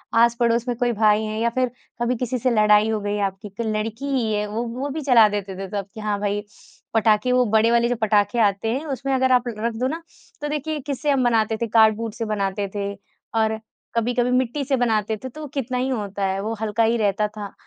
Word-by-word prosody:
आस-पड़ोस 235 Hz, +1 st, +3 dB
में 245 Hz, -, 0 dB
कोई 245 Hz, -1 st, +1 dB
भाई 215 Hz, 0 st, +3 dB
हैं 215 Hz, 0 st, -3 dB
या 235 Hz, -, +2 dB
फिर 255 Hz, -2 st, +1 dB, 0.3 s
कभी 240 Hz, +1 st, +1 dB
किसी 250 Hz, +1 st, -2 dB
से 250 Hz, +2 st, +1 dB
लड़ाई 210 Hz, -1 st, +4 dB
हो 220 Hz, -, 0 dB
गई 205 Hz, 0 st, -2 dB
है 205 Hz, -, -2 dB
आपकी, 195 Hz, +1 st, -5 dB
क 200 Hz, +4 st, -7 dB
लड़की 220 Hz, +4 st, -2 dB
ही 255 Hz, -6 st, 0 dB
है, 210 Hz, 0 st, 0 dB
वो 220 Hz, +3 st, -3 dB
वो 255 Hz, +5 st, -4 dB
भी 310 Hz, +3 st, -4 dB
चला 245 Hz, -6 st, +6 dB
देते 200 Hz, -2 st, -4 dB
थे 195 Hz, 0 st, -5 dB
सब 200 Hz, -1 st, -4 dB
कि -, -, -9 dB
हाँ, 210 Hz, -1 st, -1 dB
भाई 205 Hz, 0 st, -1 dB, 0.5 s
पटाखे 220 Hz, +2 st, +3 dB
वो 250 Hz, 0 st, +4 dB
बड़े 220 Hz, +2 st, +4 dB
वाले 235 Hz, 0 st, +3 dB
जो 245 Hz, -, +1 dB
पटाखे 215 Hz, +2 st, +2 dB
आते 205 Hz, 0 st, +2 dB
हैं, 275 Hz, +5 st, -3 dB
उसमें 275 Hz, -2 st, -2 dB
अगर 260 Hz, 0 st, +2 dB
आप 250 Hz, -1 st, +3 dB
ल 235 Hz, -, -2 dB
रख 235 Hz, -, 0 dB
दो 250 Hz, +3 st, 0 dB
ना 320 Hz, +5 st, -4 dB, 0.4 s
तो 295 Hz, -, -2 dB
देखिए, 300 Hz, +1 st, -2 dB
किससे 280 Hz, +2 st, -3 dB
हम 270 Hz, -2 st, +2 dB
बनाते 225 Hz, -2 st, +2 dB
थे, 235 Hz, -, -2 dB
कार्डबोर्ड 220 Hz, 0 st, +3 dB
से 230 Hz, 0 st, -4 dB
बनाते 200 Hz, -1 st, -1 dB
थे। 200 Hz, 0 st, -2 dB, 0.4 s
और 220 Hz, -1 st, +1 dB, 0.4 s
कभी-कभी 245 Hz, +1 st, +1 dB
मिट्टी 255 Hz, +3 st, +1 dB
से 275 Hz, -, +1 dB
बनाते 220 Hz, -3 st, +1 dB
थे, 260 Hz, -, -4 dB
तो 305 Hz, +5 st, -10 dB
वो 300 Hz, -, -5 dB
कितना 260 Hz, -2 st, -2 dB
ही 255 Hz, +1 st, 0 dB
होता 205 Hz, -5 st, -2 dB
है, 190 Hz, 0 st, -1 dB
वो 220 Hz, +3 st, -2 dB
हल्का 220 Hz, +1 st, +1 dB
ही 225 Hz, +1 st, +3 dB
रहता 210 Hz, 0 st, +1 dB
था, 210 Hz, -2 st, -8 dB
225 Hz, 240 wpm, -23 LUFS, 210-250 Hz, 0.5 s, चला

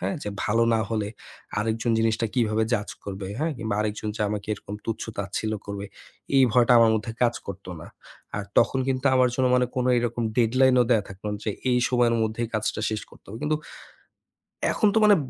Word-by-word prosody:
হ্যাঁ? -, -, -1 dB
যে -, -, -4 dB, 0.2 s
ভালো 115 Hz, +3 st, +2 dB
না 110 Hz, -, +2 dB
হলে 110 Hz, -2 st, -1 dB, 0.5 s
আরেকজন 110 Hz, +2 st, 0 dB
জিনিসটা 115 Hz, 0 st, +1 dB
কিভাবে 110 Hz, -3 st, +2 dB
judge 105 Hz, -3 st, -1 dB
করবে, 95 Hz, -1 st, -5 dB
হ্যাঁ? 160 Hz, +2 st, 0 dB
কিংবা 110 Hz, -3 st, -2 dB
আরেকজন 105 Hz, 0 st, -2 dB
যে -, -, -7 dB
আমাকে 105 Hz, -1 st, -4 dB
এরকম 105 Hz, -, -9 dB
তুচ্ছ-তাচ্ছিল্য 110 Hz, -1 st, -3 dB
করবে, 100 Hz, 0 st, -5 dB, 0.5 s
এই 135 Hz, -, +7 dB
ভয়টা 120 Hz, 0 st, +5 dB
আমার 115 Hz, -1 st, +6 dB
মধ্যে 110 Hz, +1 st, -2 dB
কাজ 120 Hz, -1 st, +3 dB
করতো 95 Hz, -1 st, -7 dB
না। -, -, -10 dB, 0.5 s
আর 105 Hz, -, -4 dB
তখন 135 Hz, -, +3 dB
কিন্তু 130 Hz, +1 st, 0 dB
আমার 130 Hz, -1 st, +5 dB
জন্য 130 Hz, 0 st, +2 dB
মানে 125 Hz, -, +2 dB
কোন 125 Hz, -, +1 dB
এরকম 120 Hz, 0 st, -1 dB
deadline 130 Hz, +2 st, +4 dB
ও -, -, 0 dB
দেয়া 115 Hz, -4 st, +4 dB
থাকতো 100 Hz, +1 st, -12 dB
না 105 Hz, -, -3 dB
যে -, -, +2 dB, 0.2 s
এই 125 Hz, -, +3 dB
সময়ের 120 Hz, -2 st, +3 dB
মধ্যে 110 Hz, +2 st, -1 dB
কাজটা 110 Hz, 0 st, -1 dB
শেষ 110 Hz, -1 st, -2 dB
করতে -, -, -19 dB
হবে। 110 Hz, +3 st, -7 dB
কিন্তু 155 Hz, +1 st, +1 dB, 1.2 s
এখন 215 Hz, -, +3 dB
তো 220 Hz, -, +5 dB
মানে 210 Hz, -1 st, +7 dB
115 Hz, 195 wpm, -25 LUFS, 105-125 Hz, 1.2 s, এই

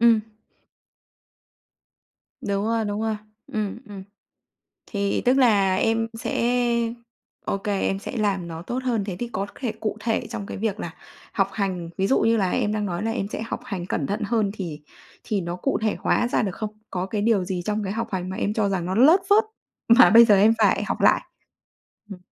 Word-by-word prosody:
Ừm. 230 Hz, -2 st, +5 dB, 2.2 s
Đúng 200 Hz, 0 st, -1 dB
rồi, 230 Hz, -1 st, 0 dB
đúng 205 Hz, 0 st, -2 dB
rồi. 220 Hz, -1 st, -1 dB, 0.4 s
Ừm, 215 Hz, 0 st, -2 dB
ừm. 195 Hz, -2 st, -8 dB, 0.8 s
Thì 200 Hz, -2 st, -1 dB
tức 250 Hz, +2 st, +4 dB
là 200 Hz, -7 st, +4 dB
em 225 Hz, +2 st, +1 dB
sẽ -, -, -2 dB, 1.0 s
OK, 195 Hz, 0 st, -3 dB
em 195 Hz, -1 st, 0 dB
sẽ 205 Hz, -, -6 dB
làm 195 Hz, -5 st, 0 dB
nó 165 Hz, 0 st, -7 dB
tốt 245 Hz, +8 st, -4 dB
hơn. 235 Hz, -5 st, 0 dB
Thế 190 Hz, -3 st, -5 dB
thì 240 Hz, -, -3 dB
có 195 Hz, +1 st, -2 dB
thể 245 Hz, -5 st, -3 dB
cụ 215 Hz, -1 st, -2 dB
thể 225 Hz, -1 st, -1 dB
trong 225 Hz, -4 st, -5 dB
cái -, -, -6 dB
việc 215 Hz, -1 st, -2 dB
là -, -, -6 dB, 0.4 s
học -, -, +1 dB
hành, 185 Hz, -5 st, -3 dB
ví 195 Hz, -, +1 dB
dụ 265 Hz, -, +3 dB
như 225 Hz, 0 st, +3 dB
là 190 Hz, -4 st, +1 dB
em 210 Hz, -, 0 dB
đang 210 Hz, -1 st, -1 dB
nói 175 Hz, +2 st, -3 dB
là 225 Hz, -, -1 dB
em 200 Hz, -4 st, -2 dB
sẽ 215 Hz, -, -5 dB
học 230 Hz, -, -4 dB
hành 195 Hz, -7 st, -5 dB
cẩn 145 Hz, -, -2 dB
thận 210 Hz, +6 st, -3 dB
hơn, 215 Hz, -2 st, +1 dB
thì 165 Hz, -7 st, -6 dB, 0.4 s
thì 210 Hz, -2 st, -1 dB
nó 170 Hz, 0 st, -4 dB
cụ 270 Hz, +9 st, -1 dB
thể 215 Hz, -, +1 dB
hóa 240 Hz, -, +1 dB
ra -, -, +1 dB
được 195 Hz, -5 st, -2 dB
không? 215 Hz, -2 st, -4 dB, 0.2 s
Có 180 Hz, 0 st, -2 dB
cái 205 Hz, +1 st, -2 dB
điều 210 Hz, -5 st, +2 dB
gì 180 Hz, -1 st, -3 dB
trong 210 Hz, +2 st, -1 dB
cái 195 Hz, -, -2 dB
học 230 Hz, +2 st, -3 dB
hành 185 Hz, -1 st, -2 dB
mà 190 Hz, -, -5 dB
em 210 Hz, -, -1 dB
cho 215 Hz, -2 st, +1 dB
rằng 185 Hz, -3 st, -1 dB
nó 185 Hz, -, -2 dB
lớt 305 Hz, -, +6 dB
phớt 425 Hz, +2 st, +5 dB, 0.4 s
mà 235 Hz, +2 st, +8 dB
bây 230 Hz, +2 st, +9 dB
giờ 215 Hz, -3 st, +5 dB
em 215 Hz, +3 st, +6 dB
phải -, -, +3 dB
học -, -, -3 dB
lại? -, -, +4 dB, 0.9 s
Ừm. 195 Hz, -, -7 dB
210 Hz, 210 wpm, -24 LUFS, 195-225 Hz, 2.2 s, bây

